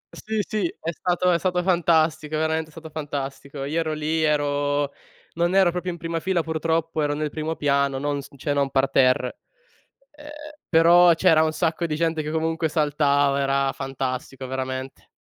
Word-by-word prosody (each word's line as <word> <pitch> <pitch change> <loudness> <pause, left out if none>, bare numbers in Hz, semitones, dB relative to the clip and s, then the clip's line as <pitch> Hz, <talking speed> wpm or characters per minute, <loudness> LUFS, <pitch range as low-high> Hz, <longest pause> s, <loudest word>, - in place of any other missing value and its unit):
Sì, 220 -1 -2
sì, 210 -5 -1
è 165 - -3
stato 180 +1 0
è 170 - +2
stato 180 0 0
fantastico, 160 -3 +2
veramente 160 0 0
è - - -18
stato 160 0 -11
fantastico. 140 -2 -5
Io 150 +4 -1
ero 155 -1 -1
lì, 155 +1 -1
ero 145 -1 0 0.4
non 170 +2 0
ero 190 -3 +5
proprio 180 +1 -3
in 170 - -7
prima 165 0 -3
fila 175 -1 0
purtroppo, 160 0 -1
ero 145 0 0
nel 150 -1 -3
primo 160 +1 -3
piano, 140 -2 +1
non 145 +1 -2
s - - -13
cioè 145 +2 -2
non 140 -1 +1
parterre. 130 -2 +2 0.7
E 295 - -16
ehm, 295 - -10 0.4
però 170 +1 +6
c'era 165 -2 +4
un 160 - +2
sacco 165 +1 -1
di 155 -2 -1
gente 165 -1 0
che 150 - -4
comunque 160 0 -1
saltava, 145 -2 +2
era 135 0 +1
fantastico 135 -1 -5
veramente. 130 0 -5
155 Hz, 175 wpm, -23 LUFS, 140-165 Hz, 0.7 s, però